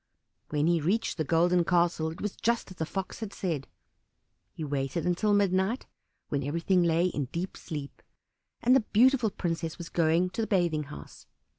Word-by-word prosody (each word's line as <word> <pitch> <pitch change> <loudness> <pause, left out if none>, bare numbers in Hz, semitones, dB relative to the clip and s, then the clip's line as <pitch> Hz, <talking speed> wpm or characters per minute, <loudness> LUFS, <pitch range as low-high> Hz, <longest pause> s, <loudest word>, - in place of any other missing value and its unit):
When 150 0 +1
he 170 -1 +3
reached 205 +9 0
the 160 - 0
Golden 170 +3 +3
Castle 170 -2 +2
it 160 - -9
was 210 -1 -3
just 235 -4 0
as 185 - -11
the 160 - -2
Fox 190 0 -4
had 220 -3 -5
said. 160 -10 -3 0.8
He 160 - -7
waited 140 +2 -2
until 180 +4 +1
midnight, 200 +3 +2 0.4
when 140 - 0
everything 170 +6 +1
lay 170 0 +3
in 150 -6 -1
deep 170 +8 -4
sleep, 145 -4 -7 0.6
and 250 +2 +6
the - - +7
beautiful 245 +1 +3
princess 165 -3 -3
was 170 -2 -7
going 170 +2 +2
to 225 - -2
the 220 - -1
bathing 170 -7 +1
house. 75 - -11
175 Hz, 175 wpm, -29 LUFS, 160-195 Hz, 0.8 s, the